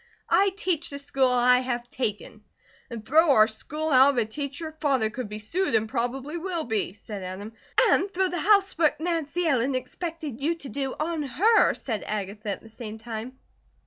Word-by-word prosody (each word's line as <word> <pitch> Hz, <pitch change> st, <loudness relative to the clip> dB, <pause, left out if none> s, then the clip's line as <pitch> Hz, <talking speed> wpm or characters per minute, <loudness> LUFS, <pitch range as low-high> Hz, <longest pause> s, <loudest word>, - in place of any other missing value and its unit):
I 395 Hz, +1 st, +5 dB
teach 355 Hz, -5 st, 0 dB
the 280 Hz, -, -5 dB
school 275 Hz, -2 st, +1 dB
I 250 Hz, 0 st, +4 dB
have 245 Hz, -1 st, -3 dB
taken." 215 Hz, -3 st, -4 dB, 0.5 s
"And 230 Hz, -3 st, -7 dB
throw 315 Hz, +1 st, +5 dB
our 215 Hz, -3 st, +6 dB
school 305 Hz, +8 st, -3 dB
out 270 Hz, +1 st, +6 dB
of -, -, -6 dB
a 235 Hz, -, +3 dB
teacher? 285 Hz, +7 st, -5 dB
Father 265 Hz, -7 st, +2 dB
could 240 Hz, -2 st, -5 dB
be 210 Hz, -, -5 dB
sued, 285 Hz, -, -1 dB
and 220 Hz, 0 st, +2 dB
probably 265 Hz, +8 st, -3 dB
will 345 Hz, -2 st, -2 dB
be," 215 Hz, -, -2 dB
said 205 Hz, -1 st, -8 dB
Adam. 190 Hz, +4 st, -7 dB, 0.3 s
"And 400 Hz, -5 st, +3 dB
throw 380 Hz, 0 st, +1 dB
the 355 Hz, -1 st, -3 dB
housework 385 Hz, -5 st, +3 dB
Nancy 335 Hz, 0 st, -1 dB
Ellen 265 Hz, -3 st, +2 dB
expected 290 Hz, +1 st, -5 dB
you 325 Hz, +4 st, +1 dB
to 295 Hz, -5 st, -8 dB
do 270 Hz, -2 st, -3 dB
on 320 Hz, 0 st, -1 dB
her," 375 Hz, -, +3 dB
said 220 Hz, -5 st, -4 dB
Agatha, 210 Hz, +1 st, -4 dB
at 200 Hz, -, -3 dB
the -, -, -13 dB
same 220 Hz, -1 st, -8 dB
time. 230 Hz, +3 st, -7 dB
265 Hz, 185 wpm, -26 LUFS, 220-320 Hz, 0.5 s, our